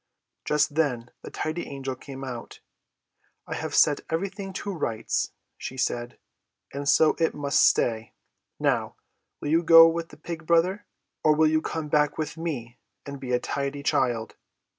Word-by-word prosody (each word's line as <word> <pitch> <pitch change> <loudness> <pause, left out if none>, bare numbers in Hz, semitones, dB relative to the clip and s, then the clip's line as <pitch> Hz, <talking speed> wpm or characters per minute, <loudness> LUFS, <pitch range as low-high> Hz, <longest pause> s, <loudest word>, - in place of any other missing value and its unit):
Just 150 0 +2
then 125 -7 0
the - - -8
Tidy 160 +2 -4
Angel 135 -1 -5
came 135 +1 -9
out. 125 -3 -7 0.9
"I - - -5
have - - -4
set 145 -2 +4
everything 195 +3 -3
to 200 +1 -4
rights," 115 -10 -2 0.3
she 130 - -6
said, 120 -1 -2 0.6
"and 140 0 -2
so 155 -1 +5
it 165 - +1
must 145 -1 +2
stay. 115 -1 +2 0.5
Now, - - 0 0.5
will 145 - -3
you 165 +2 +4
go 165 0 +9
with 165 0 -2
the - - -14
Pig 160 0 -7
Brother, 175 +4 +2 0.4
or 155 -1 +5
will 160 +1 +4
you 155 0 +2
come 160 -1 -4
back 150 0 +2
with 155 -1 -3
me, 135 -8 -5 0.3
and 140 -1 -7
be 130 -2 -5
a 125 - +3
tidy 140 +1 -3
child?" 120 -5 0
150 Hz, 160 wpm, -26 LUFS, 130-165 Hz, 0.9 s, go